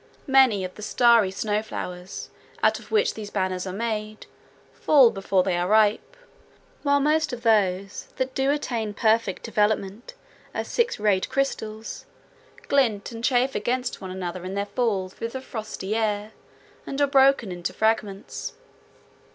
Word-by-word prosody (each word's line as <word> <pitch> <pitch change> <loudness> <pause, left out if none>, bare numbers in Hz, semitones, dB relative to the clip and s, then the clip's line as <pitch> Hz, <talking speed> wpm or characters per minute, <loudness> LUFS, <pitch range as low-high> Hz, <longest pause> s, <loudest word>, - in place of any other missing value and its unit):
Many 265 -8 +4
of 185 - -7
the - - -12
starry 230 -1 +4
snow 210 +2 -1
flowers, 180 -3 -7 0.3
out - - +3
of - - -15
which 440 +1 +2
these 210 -2 -7
banners 185 -2 -2
are - - -3
made, 215 +1 -4 0.5
fall 270 -6 +5
before 195 -1 +1
they 185 -1 0
are 175 +1 0
ripe, 215 - +2 0.6
while 285 -1 +3
most 300 +1 +2
of 245 -1 -6
those 200 -4 +1
that 260 0 -2
do 270 +1 +1
attain 235 -7 -2
perfect 220 -3 +1
development 215 - -1 0.4
as - - -3
six 470 - 0
rayed 205 -3 +1
crystals 220 - -3 0.6
glint 235 -8 +1
and 230 0 -8
chafe 255 +1 +2
against 245 +4 -2
one 190 - -6
another 185 -1 -5
in 185 +1 -5
their 200 0 -1
fall 205 -3 -1
through 210 +5 -6
the 260 +3 -6
frosty 215 -4 -5
air, 210 -1 -1 0.6
and 275 - -4
are 285 - +5
broken 270 -6 +4
into 175 -1 -4
fragments. 215 -3 -2
215 Hz, 150 wpm, -25 LUFS, 195-255 Hz, 0.6 s, fall